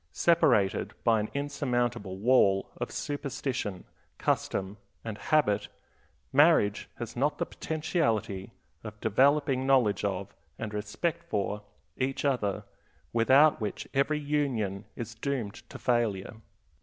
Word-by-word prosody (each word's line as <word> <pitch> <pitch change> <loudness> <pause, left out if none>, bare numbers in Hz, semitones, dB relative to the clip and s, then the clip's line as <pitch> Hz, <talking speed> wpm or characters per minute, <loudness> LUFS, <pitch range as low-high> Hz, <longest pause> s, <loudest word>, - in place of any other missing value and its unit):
Separated 120 - +3
by 115 -1 +4
an 105 - -2
insurmountable 120 -8 -1
wall 100 -3 +3
of - - -3
superstition, 135 -8 -3 0.3
custom, 95 +2 -1 0.3
and 110 -2 -4
habit, 125 -4 +1 0.7
marriage 140 -8 +4
has 115 -1 -6
not 145 +4 +1
the - - -1
potentiality 115 - -1 0.3
of 105 -1 -8
developing 135 +4 +3
knowledge 125 -8 +3
of, 100 -1 -2 0.2
and 110 -2 -5
respect 105 +11 -2
for, 105 0 -1 0.4
each 135 +2 -1
other, 105 -7 0 0.5
without 130 +5 +5
which 105 -2 -4
every 145 +2 +2
union 130 -10 -1
is 115 -1 -6
doomed 115 -3 -3 0.2
to - - -8
failure. 115 -6 0
120 Hz, 115 wpm, -29 LUFS, 105-140 Hz, 0.7 s, without